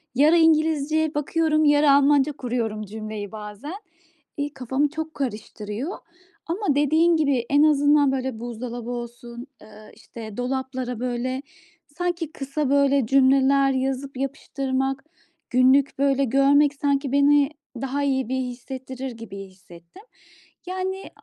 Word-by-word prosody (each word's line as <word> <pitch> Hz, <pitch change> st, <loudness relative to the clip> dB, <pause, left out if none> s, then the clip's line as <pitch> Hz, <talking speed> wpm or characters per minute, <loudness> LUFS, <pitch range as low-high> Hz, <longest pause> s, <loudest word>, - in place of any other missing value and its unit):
Yarı 305 Hz, +6 st, +5 dB
İngilizce 315 Hz, -1 st, +2 dB
bakıyorum, 310 Hz, +1 st, +1 dB
yarı 290 Hz, 0 st, +5 dB
Almanca 285 Hz, +1 st, +4 dB
kuruyorum 235 Hz, -5 st, -3 dB
cümleyi 215 Hz, 0 st, -7 dB
bazen. 215 Hz, -, -8 dB, 0.6 s
İii, 290 Hz, +1 st, -3 dB
kafamı 265 Hz, +4 st, -1 dB
çok 315 Hz, +1 st, -5 dB
karıştırıyor 225 Hz, -, -5 dB, 0.5 s
ama 345 Hz, -3 st, 0 dB
dediğin 315 Hz, +4 st, +3 dB
gibi 275 Hz, -6 st, +1 dB
en 285 Hz, +1 st, +4 dB
azından, 290 Hz, -2 st, +4 dB
böyle, 260 Hz, -3 st, -3 dB
buzdolabı 240 Hz, 0 st, -6 dB
olsun, 240 Hz, +1 st, -7 dB
eee, 215 Hz, 0 st, -15 dB
işte, 220 Hz, -2 st, -10 dB
dolaplara, 255 Hz, -1 st, -3 dB
böyle, 255 Hz, +1 st, -2 dB, 0.5 s
sanki 340 Hz, 0 st, -3 dB
kısa, 275 Hz, +1 st, -3 dB
böyle, 280 Hz, -2 st, +3 dB
cümleler 270 Hz, +1 st, +4 dB
yazıp 265 Hz, +1 st, -2 dB
yapıştırmak, 270 Hz, -1 st, -2 dB, 0.5 s
günlük, 260 Hz, +2 st, +3 dB
böyle, 275 Hz, 0 st, +2 dB
görmek 275 Hz, +3 st, +4 dB
sanki 280 Hz, -1 st, 0 dB
beni 285 Hz, 0 st, +4 dB, 0.3 s
daha 275 Hz, +2 st, -2 dB
iyi 265 Hz, -3 st, 0 dB
bir 260 Hz, -, -1 dB
hissettirir 260 Hz, +1 st, -6 dB
gibi 230 Hz, -3 st, -10 dB
hissettim. 185 Hz, -, -14 dB, 0.6 s
Yani, 375 Hz, +1 st, -4 dB
270 Hz, 120 wpm, -23 LUFS, 245-290 Hz, 0.6 s, Yarı